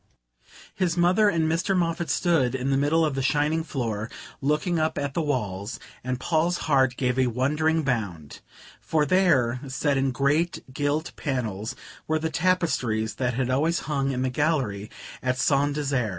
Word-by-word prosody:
His 180 Hz, -3 st, 0 dB
mother 185 Hz, +5 st, +4 dB
and 165 Hz, -4 st, +1 dB
Mr. 180 Hz, +4 st, +1 dB
Moffatt 170 Hz, -1 st, -1 dB
stood 150 Hz, -8 st, +2 dB
in 130 Hz, +1 st, -1 dB
the -, -, +3 dB
middle 155 Hz, +4 st, +3 dB
of 150 Hz, -, -1 dB
the 135 Hz, -, -2 dB
shining 150 Hz, +4 st, +1 dB
floor, 115 Hz, -8 st, -3 dB, 0.3 s
looking 150 Hz, +5 st, +1 dB
up 155 Hz, 0 st, 0 dB
at 140 Hz, -1 st, -2 dB
the 170 Hz, -, 0 dB
walls; 110 Hz, -7 st, -2 dB, 0.2 s
and 130 Hz, 0 st, -2 dB
Paul's 170 Hz, +4 st, +1 dB
heart 130 Hz, -4 st, +3 dB
gave 125 Hz, 0 st, 0 dB
a 130 Hz, -, +3 dB
wondering 150 Hz, +6 st, +1 dB
bound, 100 Hz, -, -3 dB, 0.4 s
for 155 Hz, -2 st, +1 dB
there, 140 Hz, -9 st, +3 dB
set 135 Hz, +2 st, 0 dB
in 135 Hz, 0 st, +2 dB
great 145 Hz, +7 st, 0 dB
gilt 145 Hz, +3 st, -1 dB
panels, 110 Hz, -7 st, -3 dB, 0.3 s
were 155 Hz, -, +1 dB
the 160 Hz, 0 st, -2 dB
tapestries 150 Hz, -, 0 dB
that 125 Hz, -2 st, -1 dB
had 130 Hz, 0 st, 0 dB
always 155 Hz, +6 st, +1 dB
hung 140 Hz, -3 st, -1 dB
in 130 Hz, -1 st, -1 dB
the 130 Hz, -, 0 dB
gallery 125 Hz, -9 st, 0 dB, 0.3 s
at 130 Hz, 0 st, 0 dB
Saint 140 Hz, +1 st, +2 dB
Desert. 135 Hz, -6 st, 0 dB
140 Hz, 165 wpm, -25 LUFS, 125-160 Hz, 0.4 s, mother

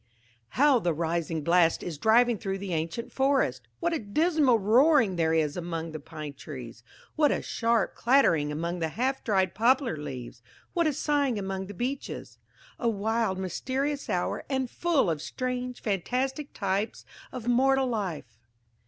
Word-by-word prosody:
"HOW 280 Hz, -2 st, +5 dB
the 175 Hz, -6 st, 0 dB
rising 165 Hz, -1 st, -1 dB
blast 170 Hz, 0 st, +3 dB
is 160 Hz, -5 st, -5 dB
driving 230 Hz, +2 st, +4 dB
through 195 Hz, -1 st, -3 dB
the 195 Hz, -2 st, -5 dB
ancient 165 Hz, +9 st, -3 dB
forest! 265 Hz, -, +1 dB
What 340 Hz, -, 0 dB
a 330 Hz, -, 0 dB
dismal 290 Hz, -, +2 dB
roaring 230 Hz, -, +4 dB
there 165 Hz, -2 st, +1 dB
is 150 Hz, -2 st, +1 dB
among 165 Hz, -2 st, -4 dB
the 155 Hz, -, -6 dB
pine 155 Hz, -1 st, -8 dB
trees! 125 Hz, -6 st, -9 dB, 0.3 s
What 300 Hz, -2 st, +4 dB
a -, -, -1 dB
sharp 230 Hz, -1 st, 0 dB
clattering 195 Hz, -, +3 dB
among 170 Hz, +4 st, -3 dB
the 160 Hz, -, 0 dB
half 260 Hz, -, -1 dB
dried 190 Hz, -4 st, +1 dB
poplar 245 Hz, -, +2 dB
leaves! 130 Hz, -5 st, -7 dB, 0.3 s
What 340 Hz, -2 st, +2 dB
a 305 Hz, -, +1 dB
sighing 285 Hz, -4 st, +1 dB
among 190 Hz, -1 st, -4 dB
the 205 Hz, -, -9 dB
beeches! 260 Hz, +6 st, -5 dB, 0.4 s
A 235 Hz, -, +1 dB
wild 220 Hz, -1 st, 0 dB
mysterious 265 Hz, -, -2 dB
hour, -, -, -1 dB
and 265 Hz, -3 st, -1 dB
full 340 Hz, -, +1 dB
of 160 Hz, -3 st, -1 dB
strange 250 Hz, +2 st, -4 dB
fantastic 255 Hz, -, -1 dB
types 200 Hz, +2 st, -2 dB, 0.3 s
of 245 Hz, -2 st, -7 dB
mortal 265 Hz, +2 st, +3 dB
life!" 185 Hz, -, -3 dB
210 Hz, 155 wpm, -28 LUFS, 165-260 Hz, 0.4 s, HOW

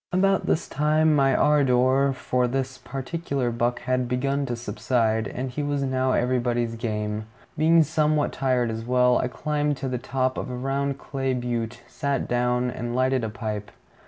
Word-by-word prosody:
About 195 Hz, +2 st, +2 dB
this 160 Hz, -, +1 dB
time 155 Hz, +2 st, +2 dB
my 135 Hz, -2 st, +3 dB
ardor 135 Hz, -1 st, +3 dB
for 125 Hz, -1 st, 0 dB
this 130 Hz, +1 st, -3 dB
particular 135 Hz, -2 st, -3 dB
buck 120 Hz, +1 st, -1 dB
had 125 Hz, 0 st, 0 dB
begun 135 Hz, +3 st, 0 dB
to 120 Hz, -, -2 dB
subside, 110 Hz, 0 st, 0 dB
and 130 Hz, +5 st, -4 dB
he 145 Hz, -, -3 dB
was 145 Hz, -1 st, -1 dB
now 130 Hz, -1 st, +1 dB
anybody's 120 Hz, -1 st, 0 dB
game. 105 Hz, -1 st, -3 dB, 0.3 s
Being 160 Hz, +2 st, +5 dB
somewhat 155 Hz, -1 st, +1 dB
tired 125 Hz, -3 st, +1 dB
as 115 Hz, 0 st, -4 dB
well, 125 Hz, +1 st, +3 dB
I -, -, 0 dB
climbed 150 Hz, +2 st, -1 dB
to 135 Hz, -, -4 dB
the 125 Hz, -1 st, -2 dB
top 130 Hz, +1 st, -1 dB
of -, -, -5 dB
a 125 Hz, -, -4 dB
round 135 Hz, +2 st, -1 dB
clay 135 Hz, -2 st, -2 dB
butte, 120 Hz, -1 st, -3 dB
sat 140 Hz, -1 st, -2 dB
down, 125 Hz, 0 st, +1 dB
and 120 Hz, +1 st, -4 dB
lighted 130 Hz, -1 st, +2 dB
a 110 Hz, -, -1 dB
pipe. 105 Hz, -2 st, -5 dB
130 Hz, 170 wpm, -25 LUFS, 120-140 Hz, 0.3 s, Being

